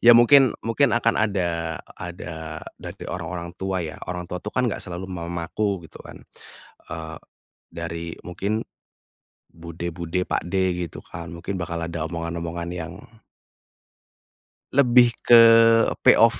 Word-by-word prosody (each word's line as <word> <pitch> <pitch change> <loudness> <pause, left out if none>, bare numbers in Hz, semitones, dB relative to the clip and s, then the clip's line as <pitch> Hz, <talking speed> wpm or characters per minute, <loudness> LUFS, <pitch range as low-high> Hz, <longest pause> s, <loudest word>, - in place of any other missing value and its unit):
ya 120 0 +8
mungkin 130 +1 +6
mungkin 120 +2 +2
akan 115 -1 +2
ada 85 -6 -1 0.2
ada 80 -2 -7 0.2
dari - - -8
orang-orang 85 -1 -5
tua 95 -2 -1
ya, 75 -2 -7
orang 90 -1 -3
tua 90 +1 -6
itu 105 - -5
kan 130 +3 0
enggak - - -3
selalu 90 0 -6
mamaku 85 +2 -3
gitu - - -13
kan, - - -12 0.7
eee, 80 -1 -6 0.6
dari 85 0 -5 0.2
mungkin, 100 +5 -2 0.9
bude-bude 85 +1 -4
pakde 95 0 0
gitu - - -10
kan 85 0 -9
mungkin 95 +3 -5
bakal 85 -1 -4
ada 85 -1 -3
omongan-omongan 85 0 -4
yang 90 -2 -5 1.8
lebih 125 -3 +5
ke 120 -1 +8 0.6
POV - - +6
85 Hz, 125 wpm, -24 LUFS, 85-100 Hz, 1.8 s, ya